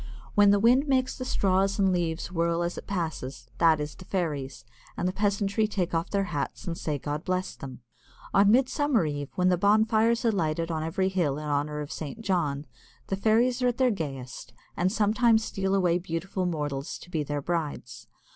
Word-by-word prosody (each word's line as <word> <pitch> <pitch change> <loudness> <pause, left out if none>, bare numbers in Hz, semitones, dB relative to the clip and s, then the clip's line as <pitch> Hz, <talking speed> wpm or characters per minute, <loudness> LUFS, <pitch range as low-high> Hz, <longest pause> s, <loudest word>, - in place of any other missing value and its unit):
When 205 -1 +6
the 205 - +5
wind 250 +7 +4
makes 260 -2 +1
the 255 - -5
straws 195 -3 +1
and 195 -2 +3
leaves 170 -1 -2
whirl 170 -1 0
as 175 +1 -2
it - - -9
passes, 140 - -4
that 160 -2 +5
is 150 0 -4
the - - -13
fairies, 150 - -3 0.3
and 180 - 0
the - - +1
peasantry 200 +1 +1
take 185 -5 -2
off 165 +2 -1
their 200 -1 +1
hats 145 - -3
and 170 -3 -3
say, 150 -3 -2
"God 145 +3 -4
bless 185 -1 -2
them." 130 -2 -9 0.5
On 200 +1 +5
Midsummer 260 - +3
Eve, 145 -2 -3
when 180 0 +3
the 180 -2 +2
bonfires 220 +3 +3
are 230 - +4
lighted 165 -3 -1
on 160 -1 -2
every 175 +4 0
hill 170 -7 0
in 150 - -6
honour 150 +1 -1
of 145 - -7
St. 155 +8 -6
John, 155 -9 -1 0.4
the 195 - 0
fairies 230 +5 +2
are 250 - +3
at 245 - 0
their 255 -2 +3
gayest, 135 - -6 0.2
and 180 +2 +1
sometime 225 +2 +3
steal 195 -3 -1
away 180 -2 +2
beautiful 180 +2 -3
mortals 145 -4 -3
to 180 - -14
be 160 - 0
their 145 -1 -3
brides. 150 -8 -4
180 Hz, 195 wpm, -27 LUFS, 155-205 Hz, 0.5 s, When